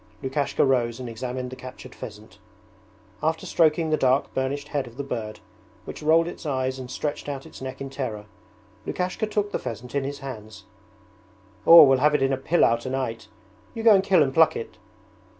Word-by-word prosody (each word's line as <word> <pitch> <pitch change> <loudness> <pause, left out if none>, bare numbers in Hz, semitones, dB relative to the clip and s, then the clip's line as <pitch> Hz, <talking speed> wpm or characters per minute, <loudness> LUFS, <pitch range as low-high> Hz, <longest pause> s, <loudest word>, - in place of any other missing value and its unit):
Lukashka 135 +2 0
rose 120 -3 +1
and 125 - -6
examined 125 +2 -5
the - - -7
captured 130 0 -11
pheasant. 105 -2 -11 0.8
After 160 +1 -1
stroking 160 0 +2
the 155 - +3
dark 130 0 +1
burnished 140 +2 -2
head 140 -4 -2
of 120 +1 -14
the 140 - -3
bird, 110 -5 -5 0.4
which - - -8
rolled 165 +2 +4
its 175 - -8
eyes 130 -3 -2
and 125 -1 -8
stretched 145 +2 -4
out 135 -1 -5
its - - -12
neck 130 0 -6
in 135 0 -6
terror, 115 -7 -5 0.6
Lukashka 185 +4 -2
took 210 -1 -1
the - - -2
pheasant 120 +2 -7
in 140 -1 0
his 140 +1 -4
hands. 110 -8 -9 1.0
'We'll 145 -6 +9
have 150 +2 +3
it 140 - +2
in 135 0 +2
a - - 0
pilau 135 -4 +3
tonight. 120 -3 -4 0.5
You 225 - -4
go 225 -2 +8
and 190 -1 +4
kill 190 -5 +4
and 135 -1 -2
pluck 160 0 +5
it.' 115 - -7
135 Hz, 185 wpm, -25 LUFS, 125-150 Hz, 1.0 s, We'll